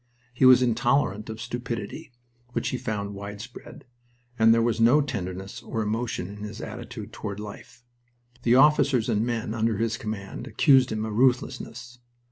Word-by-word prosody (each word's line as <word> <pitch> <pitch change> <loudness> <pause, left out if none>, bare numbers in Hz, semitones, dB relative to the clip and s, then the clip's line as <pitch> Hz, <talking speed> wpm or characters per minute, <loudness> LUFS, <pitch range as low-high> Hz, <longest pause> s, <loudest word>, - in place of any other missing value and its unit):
He 125 +2 +3
was 130 0 +8
intolerant 120 -3 +1
of 110 0 -6
stupidity, 120 -2 -5 0.4
which - - -1
he 130 - -2
found 105 -4 -3
widespread, 105 +7 -9 0.5
and 110 0 +6
there 115 - +5
was 115 -1 0
no 120 +6 +6
tenderness 95 -9 -4
or 110 - -3
emotion 110 -3 -2
in 100 +2 -9
his 105 +1 -7
attitude - - -8
toward 100 -1 -5
life. 120 +4 -10 0.6
The 120 0 +3
officers 135 -4 +4
and 110 -1 +1
men 115 -2 -2
under 115 -2 0
his 115 0 -1
command 105 -3 -6
accused 135 -4 +4
him 110 0 -2
of 110 - -4
ruthlessness. 125 0 0
115 Hz, 155 wpm, -26 LUFS, 105-125 Hz, 0.6 s, was